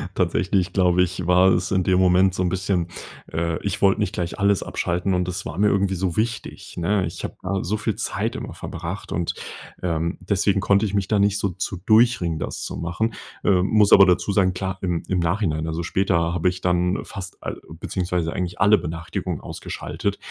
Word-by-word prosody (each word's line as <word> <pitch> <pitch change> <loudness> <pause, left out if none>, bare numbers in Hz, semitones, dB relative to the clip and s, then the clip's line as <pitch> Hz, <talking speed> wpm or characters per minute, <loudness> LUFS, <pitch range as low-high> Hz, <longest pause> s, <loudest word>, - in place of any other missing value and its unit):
Tatsächlich, 90 +1 +1
glaube 90 -2 +4
ich, 90 -1 -3
war 90 +1 +5
es 90 0 +1
in 95 -2 +2
dem 95 0 +3
Moment 90 0 +4
so 90 - -2
'n 90 - +1
bisschen 90 -2 -1 0.4
äh, 80 0 -1
ich 100 - -2
wollte 100 +1 +4
nicht 100 -1 -1
gleich 85 +1 -3
alles 100 -1 +2
abschalten. 90 +2 -1
Und 90 0 0
das 90 0 -4
war 75 +4 -6
mir 105 - +4
irgendwie 100 -1 +2
so 90 -1 -1
wichtig, 115 +1 -3
ne? 95 +2 +1
Ich 80 - -6
habe - - -5
da 95 +1 -1
so 105 +4 -1
viel - - -2
Zeit - - -2
immer - - -6
verbracht. 85 +4 -6
Und, 85 0 -1 0.5
ähm, 85 0 -1
deswegen 100 +1 +1
konnte 100 +2 +3
ich 100 - -3
mich 95 -2 0
da 105 -2 +2
nicht 100 0 +3
so 100 - 0
zu 95 +1 -4
durchringen, 110 -8 +3
das - - -4
zu - - -5
machen, 95 +7 -2 0.3
äh, 95 -3 +4
muss 105 +1 +3
aber 100 - +9
dazu 90 +3 +2
sagen. 95 -2 +3
Klar, 95 +1 -3
im 90 -3 -1
im 90 -1 0
Nachhinein, 85 -3 0
also, 80 +1 -2
später 85 -2 +1
habe 90 +1 +2
ich 90 0 -6
dann 90 +1 +1
fast 95 -2 -7
a - - -3 0.3
beziehungsweise 90 -3 -2
eigentlich 90 -1 -4
alle 105 +2 +6
Benachrichtigungen 85 +2 -4
ausgeschaltet. - - -4
90 Hz, 205 wpm, -23 LUFS, 85-100 Hz, 0.5 s, aber